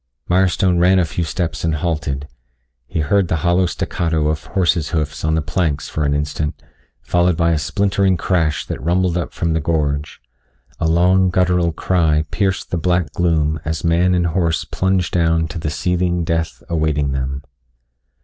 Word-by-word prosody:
Mirestone 90 0 +2
ran 90 +2 +4
a 90 - +3
few 80 +3 -3
steps 85 +1 -3
and 80 -2 +1
halted. 75 -3 -2 0.6
He 80 - -2
heard 95 +5 +2
the 80 - 0
hollow 90 +1 +3
staccato 80 -3 -1
of 75 -1 -2
horse's 85 -4 0
hoofs 75 -3 -2
on 80 0 +1
the 80 - 0
planks 75 -3 -1
for 75 - -1
an 70 0 +1
instant, 75 +1 -2 0.4
followed 90 -1 +2
by 85 -1 +2
a 80 - +1
splintering 95 +3 +1
crash 80 -5 0
that - - -5
rumbled 90 +3 +1
up 85 -3 -2
from 85 -1 -1
the 80 - +1
gorge. 75 -2 -1 0.6
A 80 - +1
long, 90 +3 +3
guttural 90 -1 +2
cry 80 -3 +1
pierced 95 -2 -1
the 90 - 0
black 90 0 0
gloom 80 -3 +1
as 80 -1 -3
man 85 +2 +3
and 90 -1 +1
horse 85 -1 0
plunged 95 -1 0
down 80 -2 +2
to 85 - -5
the 80 - -2
seething 90 +3 0
death 80 0 -2
awaiting 75 -4 0
them. 70 +1 -3
85 Hz, 170 wpm, -19 LUFS, 75-90 Hz, 0.6 s, ran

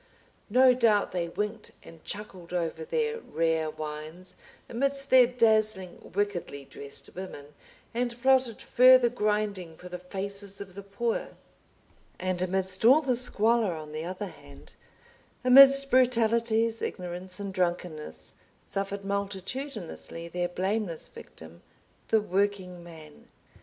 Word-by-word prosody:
No 255 +3 +6
doubt 225 -5 +2
they 175 -2 -2
winked 210 +4 -4
and 165 -1 -15
chuckled 190 -4 -7
over 165 -2 -2
their 455 - -1
rare 165 - -1
wines, 155 +4 -7 0.3
amidst 275 +3 -2
their 255 -2 +8
dazzling, 215 -6 +1
wickedly 185 -9 -2
dressed 140 +1 -8
women, 150 -6 -9 0.4
and 240 0 -2
plotted 260 -3 +2
further 255 -1 +6
grinding 210 -7 -2
for 180 - -11
the 180 0 -6
faces 200 +2 -6
of 195 -2 -9
the 200 - -8
poor. 210 +4 -3 0.8
And 185 -1 -2
amidst 190 +1 0
all 265 +7 +7
the 260 -4 +1
squalor 230 -5 +2
on 155 -1 -8
the 155 +1 -5
other 185 +3 -4
hand, 145 -7 -14 0.7
amidst 275 +2 +8
brutalities, 230 -2 +2
ignorance, 180 +1 -5
and 200 -1 -5
drunkenness, 175 -4 -3 0.3
suffered 195 0 -3
multitudinously 200 - -5
their 175 +1 -2
blameless 190 -1 -2
victim, 80 +1 -12 0.5
the 220 -1 +3
Working 190 -3 -1
Man. 160 -3 -14
200 Hz, 120 wpm, -28 LUFS, 175-230 Hz, 0.8 s, their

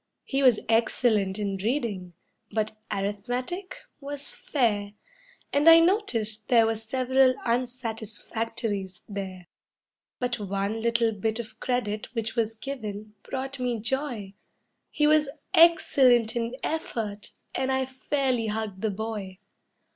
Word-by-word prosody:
He 275 0 -1
was 250 -5 +6
excellent 220 -3 +2
in 200 -2 -2
reading, 205 -5 -2 0.4
but 215 -1 -1 0.2
arithmetic, 245 - -3 0.2
was 285 0 -5
fair, 205 -7 0 0.6
And 290 +3 +6
I 330 0 +10
noticed 235 - +1
there 230 -2 +6
were 225 - +2
several 255 +3 +2
"unsatisfactorys" 225 -4 -3
there; 190 -3 -6 0.7
But 245 -1 -1
one 200 +2 -2
little 235 0 +2
bit 220 +1 -1
of 235 -1 -6
credit 225 -2 -2
which 220 -1 -2
was 225 -1 0
given 215 -5 -6
brought 270 0 -5
me 245 -2 0
joy 235 -3 -2 0.6
He 300 - +1
was 300 -1 +4 0.2
"excellent 270 -9 +5
in 235 +1 -1
effort," 220 -10 -3 0.2
and 265 0 0
I 265 0 +1
fairly 260 -2 -1
hugged 210 -3 -3
the 220 - +1
boy. 205 -2 -5
230 Hz, 120 wpm, -27 LUFS, 210-260 Hz, 0.7 s, I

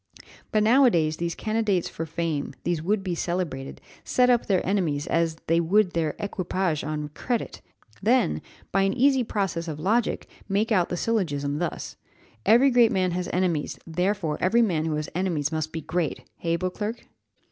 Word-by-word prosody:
But 215 -1 +3
now 250 +6 +5
a - - +7
days, 155 -6 +1
these 170 0 -2
candidates 215 -5 0
for 165 - -5
fame, 160 -3 -2
these 170 -2 0
would 195 +4 0
be 185 -2 -2
celebrated, 170 -6 -3 0.2
set 250 0 +3
up 240 -1 +2
their 190 -3 +2
enemies 170 -7 0
as 165 -2 +1
they 165 +1 +3
would 185 +3 +3
their 160 -3 -1
equipages, 185 -5 -2
on 150 0 -3
credit 235 - -3 0.4
then, 235 +3 +2 0.3
by 195 - +2
an 195 0 +2
easy 265 0 +4
process 195 -6 -2
of 155 -2 -5
logic, 220 +8 0 0.2
make 210 +4 +1
out 185 -5 +3
the 175 - -2
syllogism 150 -10 -1
thus: 175 -1 -4 0.5
Every 255 +5 +6
great 240 -2 +5
man 185 -1 +1
has 180 +1 -2
enemies, 175 -5 0
therefore, 180 -1 -1
every 230 +6 +4
man 165 -7 0
who 160 -1 -1
has 150 0 -3
enemies 170 -5 -1
must 155 0 -2
be 160 - -4
great 165 -1 -2
hey, 165 -1 0
Beauclerc?" 205 +6 -3
180 Hz, 175 wpm, -25 LUFS, 160-210 Hz, 0.5 s, a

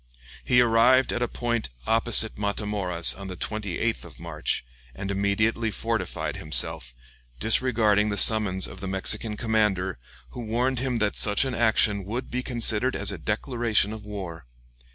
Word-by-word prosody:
He 125 0 +4
arrived 120 +3 +4
at 120 - -3
a 120 - +1
point 120 - -3 0.2
opposite 115 +1 +2
Matamoras 100 -4 +1
on 100 0 -9
the 90 -1 -7
28th 105 -4 -3
of - - -13
March, - - -3 0.3
and 100 +8 -5
immediately 110 +3 0
fortified 110 -2 -3
himself, - - -1 0.4
disregarding 110 - +2
the 100 - -3
summons 100 -3 +4
of - - -7
the 95 - -6
Mexican 95 +3 0
commander, 105 - 0 0.3
who - - -7
warned 120 +3 -1
him 130 -1 -1
that 105 -2 -1
such 105 +5 +3
action 110 -5 +1
would 115 +7 -5
be 125 - -2
considered 120 0 +2
as - - 0
a - - -6
declaration 115 -4 0
of 110 -1 -9
war. 95 -8 -8
110 Hz, 150 wpm, -25 LUFS, 100-120 Hz, 0.4 s, He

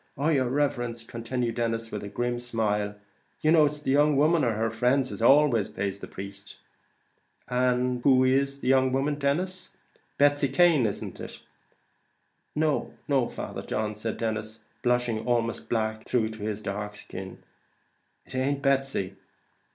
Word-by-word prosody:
"Oh, 145 +4 +1
yer 130 -5 +2
riverence," 120 -4 -1
continued 115 +1 -3
Denis, 115 -1 -1
attempting 105 -1 -5
a - - -18
grim 120 +1 -1
smile, 105 -4 -1 0.5
"you 155 - +3
know 160 -2 +6
it's 150 0 -2
the 135 - 0
young 145 +1 +4
woman, 155 +3 +4
or 120 -3 +2
her 110 +1 -1
friends, 125 +3 +1
as 100 - -6
always 130 -3 +5
pays 100 0 -3
the - - -8
priest 100 +1 -9 0.9
mostly." 125 0 +2
"And 125 0 +1
who 130 -1 +5
is 140 +1 +1
the - - -4
young 130 0 +4
woman, 140 +3 +1
Denis; 180 +7 -2 0.4
Betsy 145 0 +4
Cane, 145 -3 +4
isn't 100 - -5
it?" - - -8 1.1
"No, 155 -1 0 0.4
Father - - -6
John," 110 0 -2
said 110 +1 -4
Denis, 110 -1 -3 0.2
blushing 120 -2 +1
almost 115 -1 0
black 110 -1 -1
through 115 -3 +1
his 110 -1 -4
dark 105 0 -4
skin; 95 -2 -9 0.8
"it - - -13
ain't 135 +2 -1
Betsy." 135 -9 0
120 Hz, 150 wpm, -27 LUFS, 110-140 Hz, 1.1 s, know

